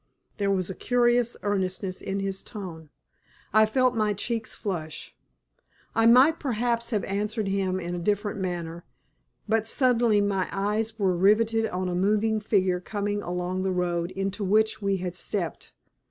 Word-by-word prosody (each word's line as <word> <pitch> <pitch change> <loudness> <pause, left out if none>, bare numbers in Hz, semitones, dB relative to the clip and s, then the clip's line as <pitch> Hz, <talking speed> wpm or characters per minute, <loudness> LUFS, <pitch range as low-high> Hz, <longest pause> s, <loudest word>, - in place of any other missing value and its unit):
There 200 -1 0
was 185 -3 +1
a 190 - -4
curious 240 +1 +2
earnestness 190 -2 -1
in 195 0 -3
his 195 -1 -2
tone. 170 -8 -8 0.6
I 215 0 +6
felt 255 +3 +2
my 215 -2 +1
cheeks 225 +2 -3
flush. 170 -7 -5 0.8
I 225 +1 +4
might 260 +7 +6
perhaps 235 -3 -1
have 215 -4 0
answered 210 +2 -2
him 190 -1 0
in 175 -1 -4
a 175 - -3
different 205 +3 -1
manner, 170 -2 -4 0.6
but 220 0 +1
suddenly 235 -4 +3
my 200 -2 0
eyes 210 +3 -1
were 190 -4 +1
riveted 220 +4 +3
on 185 -1 -3
a 180 - -2
moving 215 +4 +2
figure 190 -4 +1
coming 205 +2 -3
along 180 +1 -3
the 190 0 0
road 175 -1 -1
into 195 +2 -3
which 215 +3 +2
we 195 -1 +1
had 180 -1 -4
stepped. 180 -2 -3
200 Hz, 155 wpm, -26 LUFS, 185-220 Hz, 0.8 s, I